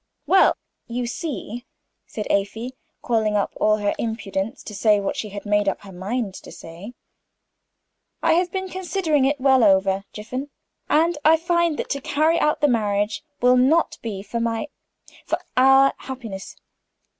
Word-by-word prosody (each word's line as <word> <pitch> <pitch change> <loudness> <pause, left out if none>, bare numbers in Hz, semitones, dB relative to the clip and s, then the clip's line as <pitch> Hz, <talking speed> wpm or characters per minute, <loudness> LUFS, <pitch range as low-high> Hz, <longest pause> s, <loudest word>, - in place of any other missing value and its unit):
"Well 380 0 +4 0.3
you 245 +1 -3
see," 245 -3 -5 0.4
said 210 - -5
Afy, 220 +5 -1 0.3
calling 220 -3 +1
up 205 - 0
all 215 0 +3
her 205 -1 0
impudence 220 -3 -3
to 210 - -8
say 210 0 +3
what 200 - -2
she 215 - -4
had 200 +1 -8
made 205 -1 +2
up - - -4
her 195 - -12
mind 195 +3 -3
to - - -11
say, 175 +9 -10 1.3
"I 325 -1 +4
have 350 +1 +1
been 380 0 -3
considering 360 -6 0
it 280 +1 +1
well 265 -2 +4
over, 195 -1 +3
Jiffin, 255 +7 -6 0.4
and 325 +1 +2
I 320 +1 +6
find 340 -1 +1
that - - -4
to 280 - -2
carry 310 +5 +2
out 300 - +1
the 295 - +5
marriage 210 -3 0 0.2
will 250 +1 +5
not 290 +7 +3
be 200 -4 -5
for 235 +3 -4
my 230 +4 -2 0.5
for - - -1 0.2
our 270 +1 +6
happiness. 230 -8 -8
240 Hz, 160 wpm, -23 LUFS, 205-295 Hz, 1.3 s, I